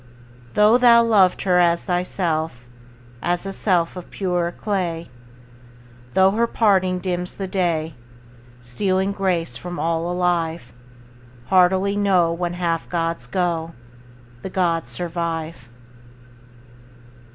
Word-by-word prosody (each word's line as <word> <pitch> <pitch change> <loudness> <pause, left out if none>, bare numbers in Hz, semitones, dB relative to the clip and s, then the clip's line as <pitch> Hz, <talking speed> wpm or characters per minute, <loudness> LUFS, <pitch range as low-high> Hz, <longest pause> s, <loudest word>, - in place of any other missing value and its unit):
Though 210 +4 +5
thou 235 -1 +6
loved 205 -5 +3
her 180 -2 +3
as 170 -1 +3
thyself, 165 - -2 0.6
As 175 +4 -1
a 195 - -4
self 180 -4 0
of 180 - -9
purer 180 -3 -1
clay, 175 - -3 1.0
Though 190 0 +5
her 230 +3 +1
parting 190 -5 +2
dims 180 -1 -3
the 195 - -4
day, 170 -4 -1 0.7
Stealing 190 - -1
grace 180 -10 -1
from 175 0 -7
all 165 +2 -1
alive; 170 -5 -1 0.8
Heartily 190 +2 +3
know, 185 -5 +2
When 175 0 -3
half 170 -2 -2
gods 165 -1 -2
go, 170 -3 -2 0.7
The 190 - -6
gods 170 -8 0
survive. 165 -2 -4
180 Hz, 110 wpm, -21 LUFS, 165-190 Hz, 1.0 s, thou